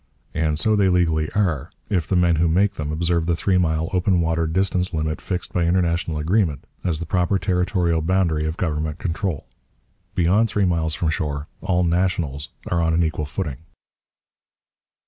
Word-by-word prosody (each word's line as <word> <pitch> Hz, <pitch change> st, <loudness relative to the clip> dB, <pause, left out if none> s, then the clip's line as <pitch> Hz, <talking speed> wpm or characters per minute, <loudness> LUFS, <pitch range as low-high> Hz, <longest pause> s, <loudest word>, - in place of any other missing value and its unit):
And 80 Hz, -1 st, 0 dB
so 110 Hz, +6 st, +2 dB
they 100 Hz, -2 st, +3 dB
legally 80 Hz, -4 st, +2 dB
are, 85 Hz, -7 st, 0 dB, 0.2 s
if 90 Hz, -6 st, 0 dB
the 95 Hz, -, 0 dB
men 85 Hz, -2 st, +3 dB
who 85 Hz, +2 st, +3 dB
make 95 Hz, +5 st, +2 dB
them 75 Hz, -5 st, -4 dB
observe 85 Hz, +1 st, 0 dB
the 85 Hz, -, +2 dB
three 90 Hz, +2 st, +1 dB
mile 80 Hz, -2 st, +1 dB
open 90 Hz, 0 st, +2 dB
water 80 Hz, 0 st, +1 dB
distance 90 Hz, +1 st, 0 dB
limit 80 Hz, 0 st, -2 dB
fixed 90 Hz, -2 st, -4 dB
by 85 Hz, -2 st, +1 dB
international 85 Hz, -2 st, +1 dB
agreement 80 Hz, -, +1 dB, 0.2 s
as 85 Hz, -4 st, 0 dB
the 85 Hz, -, -5 dB
proper 90 Hz, +3 st, +1 dB
territorial 90 Hz, -3 st, +1 dB
boundary 80 Hz, -3 st, +1 dB
of 80 Hz, -, -4 dB
government 75 Hz, -2 st, -2 dB
control. 85 Hz, -3 st, -3 dB, 0.7 s
Beyond 95 Hz, +6 st, +3 dB
three 105 Hz, -2 st, +1 dB
miles 80 Hz, -3 st, 0 dB
from 80 Hz, 0 st, 0 dB
shore 75 Hz, -3 st, -2 dB, 0.2 s
all 90 Hz, -1 st, +1 dB
'nationals' 85 Hz, -5 st, 0 dB, 0.2 s
are 85 Hz, -, 0 dB
on 80 Hz, -1 st, +2 dB
an 85 Hz, -, +3 dB
equal 80 Hz, -1 st, -1 dB
footing. 75 Hz, -5 st, -4 dB
85 Hz, 170 wpm, -22 LUFS, 80-90 Hz, 0.7 s, they